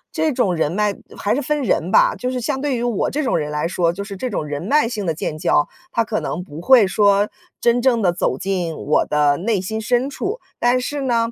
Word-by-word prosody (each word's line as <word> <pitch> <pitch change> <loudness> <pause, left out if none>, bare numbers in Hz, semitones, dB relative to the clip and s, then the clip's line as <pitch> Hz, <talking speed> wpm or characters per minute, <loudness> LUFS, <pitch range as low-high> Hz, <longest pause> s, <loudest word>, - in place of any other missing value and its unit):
这 315 -1 +1
种 230 -9 +1
人 160 -2 0
脉 205 +2 0 0.2
还 205 - 0
是 285 - -1
分 300 +2 -1
人 - - 0
吧， - - +5
就 250 - -3
是 255 - -2
相 265 +3 -2
对 280 -3 0
于 - - -3
我 240 -5 0
这 300 - -1
种 260 - +1
人 150 -2 -3
来 150 +2 -1
说， 175 -1 +1
就 185 +4 -6
是 200 -1 -7
这 250 +7 -3
种 190 -8 -3
人 145 -1 -4
脉 280 +6 +3
性 220 -4 -4
的 165 - 0
建 155 0 -4
交， 150 -1 +2 0.2
它 230 - +1
可 215 0 -2
能 - - -3
不 155 -3 -9
会 235 +1 +6
说 200 +1 +3 0.3
真 240 +1 +2
正 240 -3 +2
地 180 -4 +2
走 130 - -1
进 180 -1 -2
我 150 - +1
的 150 -1 +2
内 205 +4 0
心 220 +4 -4
深 245 +4 +1
处。 400 - -4 0.2
但 245 +1 +3
是 285 +3 -3
呢， 235 -3 +1
215 Hz, 265 characters per minute, -20 LUFS, 175-255 Hz, 0.3 s, 会